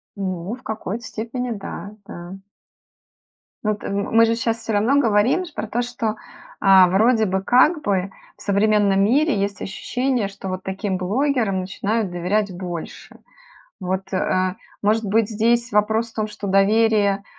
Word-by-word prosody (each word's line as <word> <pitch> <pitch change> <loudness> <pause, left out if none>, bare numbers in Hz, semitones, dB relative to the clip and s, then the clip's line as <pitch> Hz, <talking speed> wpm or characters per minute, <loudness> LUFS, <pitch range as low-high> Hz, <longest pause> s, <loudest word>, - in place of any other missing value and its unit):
Ну, 185 +1 -4
в 255 - -19
какой-то 220 0 -5
степени 240 +2 -4
да, 205 0 -7
да. 175 +2 -9 1.3
Ну, 215 - +1
это, 210 - -5
мы 200 +3 +3
же 230 0 +1
сейчас 230 0 -1
всё 225 -1 -4
равно 230 +8 +3
говорим 230 - +2
про 215 - -4
то, 240 +3 -1
что, 240 -2 -3
э, 215 - -1 0.7
вроде 220 +4 +3
бы 190 -1 -1
как 300 - +4
бы 195 -6 -1 0.3
в - - -18
современном 200 -1 +2
мире 275 +2 +2
есть 200 -1 -2
ощущение, 245 +3 -1
что 195 0 -9
вот 185 0 -4
таким 190 0 -3
блогерам 215 0 0
начинают 200 +2 -2
доверять 185 +3 -1
больше. 175 -2 -7 0.6
Вот, 190 +1 -3
э, 185 0 0 0.3
может 215 +2 +2
быть, 210 +1 +2
здесь 235 +2 +1
вопрос 220 +2 +1
в - - -26
том, 215 -1 -1
что 210 -1 -7
доверие, 200 0 +3
210 Hz, 150 wpm, -21 LUFS, 195-230 Hz, 1.3 s, как